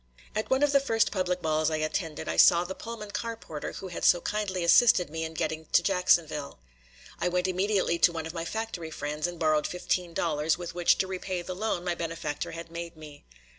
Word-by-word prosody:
At 215 - -2
one 265 +2 +3
of 290 - +4
the 280 - +5
first 225 -5 +1
public 180 -2 -1
balls 155 0 +1
I 160 - -1
attended 155 +1 -3
I 80 - -1
saw 170 - +6
the 180 +2 -5
Pullman 220 -1 -8
car 230 +2 -3
porter 155 -8 -7
who 190 - -7
had 175 - -6
so 175 - +6
kindly 195 -2 -2
assisted 180 -2 +5
me 160 0 -3
in 160 0 -5
getting 160 0 -2
to - - +5
Jacksonville. 170 -6 +1 0.6
I - - 0
went 180 +1 0
immediately 185 -2 +1
to 175 - +5
one 160 -1 -4
of 165 - -6
my 165 -1 -3
factory 195 -3 -4
friends 150 +1 -3
and 175 0 -7
borrowed 155 -2 +2
fifteen 180 -1 -2
dollars 155 -1 +1
with 175 -1 -6
which 175 0 +3
to - - +1
repay 185 -1 -4
the 185 - -5
loan 195 -2 -2
my 175 - +1
benefactor 165 -3 -4
had 165 0 -8
made 170 -1 -7
me. 150 -2 -12
175 Hz, 215 wpm, -28 LUFS, 160-190 Hz, 0.6 s, saw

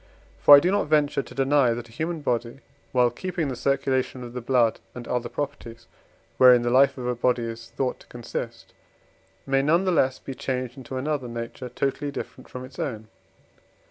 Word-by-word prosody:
For 145 - +10
I - - +8
do 175 +5 +1
not 200 -5 +1
venture 150 -2 +2
to 125 - -13
deny 135 -3 +3
that 120 0 -7
a - - -18
human 160 +6 -3
body, 120 -1 -2 0.3
while 125 -1 +3
keeping 170 +2 -3
the 130 - -3
circulation 130 -1 -1
of 120 0 -9
the 125 - -5
blood 120 -2 +2 0.2
and 125 -1 -8
other 125 -1 -2
properties, 115 -5 -6 0.5
wherein 125 -2 +7
the 120 - 0
life 135 +3 +4
of 125 - -5
a 125 - 0
body 125 0 +1
is 115 0 -7
thought 130 -2 -2
to - - -18
consist, 120 -1 -7 0.7
may 135 0 +2
none 165 +7 +2
the 185 - +2
less 130 -6 +2
be 135 - -8
changed 130 -1 -3
into 130 -1 -7
another 140 -1 -2
nature 115 +2 -6
totally 140 +3 -2
different 135 -2 -8
from 125 0 -7
its 130 0 -14
own. 110 -4 -4
130 Hz, 195 wpm, -25 LUFS, 120-140 Hz, 0.7 s, For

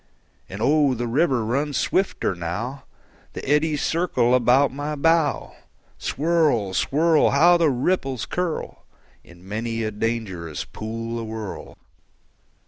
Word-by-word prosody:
And 100 +4 -5
oh, 145 0 +3
the 120 +1 -3
river 130 -1 +1
runs 140 +5 -1
swifter 190 - 0
now; 100 +11 -5 0.5
The - - -7
eddies 150 +1 +1
circle 145 -8 +1
about 125 +2 +4
my 145 +2 -4
bow. 165 0 +1 0.5
Swirl, 150 - +1
swirl! 155 - +3
How 170 +5 +5
the 165 -2 +3
ripples 135 -2 -1
curl 180 -3 -4 0.4
In 85 +1 -17
many 115 +2 -3
a 110 - -2
dangerous 105 -8 -3
pool 115 +2 -5
awhirl! 110 -2 -7
125 Hz, 120 wpm, -23 LUFS, 110-150 Hz, 0.5 s, How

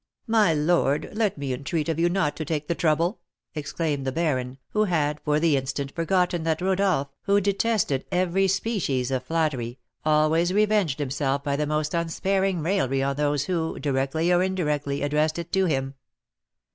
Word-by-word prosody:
"My 220 -6 +3
lord, 150 -2 +1
let 210 -5 0
me 140 -2 -3
entreat 150 +5 -2
of 165 -1 -1
you 170 +1 +3
not 175 -5 0
to 155 - -3
take 150 -1 -3
the - - +1
trouble," 170 +4 +1 0.3
exclaimed 150 -1 -2
the 135 - -1
baron, 130 -5 -1
who 215 0 +1
had 150 -5 0
for 150 0 +2
the 160 -2 +3
instant 135 +1 -3
forgotten 175 0 +1
that 160 -1 0
Rodolph, 185 -6 +1 0.2
who 200 +1 +4
detested 200 - 0
every 185 +2 +2
species 185 - -1
of 130 -1 0
flattery, 130 -6 -1 0.3
always 155 +3 +3
revenged 210 -8 +2
himself 140 -1 -1
by 140 -1 0
the 150 +1 -1
most 150 0 -1
unsparing 185 +1 0
raillery 135 -7 +1
on 140 0 0
those 145 -1 0
who, 165 0 -2
directly 145 +5 0
or 175 - +4
indirectly, 150 -7 -1
addressed 150 +2 +1
it 170 0 -6
to 190 0 +2
him. 135 -5 -1
155 Hz, 170 wpm, -25 LUFS, 140-180 Hz, 0.3 s, who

